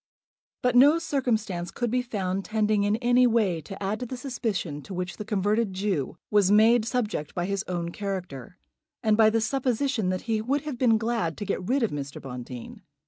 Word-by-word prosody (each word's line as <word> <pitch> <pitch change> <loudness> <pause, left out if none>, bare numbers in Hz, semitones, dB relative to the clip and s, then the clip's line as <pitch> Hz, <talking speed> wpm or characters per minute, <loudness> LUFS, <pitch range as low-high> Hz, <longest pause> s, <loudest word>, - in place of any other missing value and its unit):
But 250 -1 +2
no 285 +6 +7
circumstance 220 - -1
could 240 -2 -2
be 250 +1 +2
found 195 -6 -2
tending 215 -1 +1
in 205 +1 +2
any 245 +1 +4
way 210 -8 +1
to 195 +6 -8
add 205 +3 -1
to 250 - -4
the 255 - -5
suspicion 220 - -3
to 190 +5 -8
which 180 0 -4
the - - -4
converted 210 0 0
Jew 185 -8 -2
was 205 -3 +4
made 220 +2 +5
subject 225 - -2
by 175 - -1
his 200 0 -1
own 170 -2 -3
character, 180 - -5 0.5
and 215 -1 +4
by 220 0 +6
the 225 +1 +1
supposition 250 -3 0
that 185 0 -1
he 225 -2 -1
would 275 +6 0
have 290 -5 -6
been 230 -4 +4
glad 225 -7 -1
to 205 - -4
get 190 -1 -3
rid 265 0 +2
of 225 - +1
Mr. 140 -1 -5
Bonteen. 125 -2 -8
215 Hz, 195 wpm, -26 LUFS, 185-240 Hz, 0.5 s, no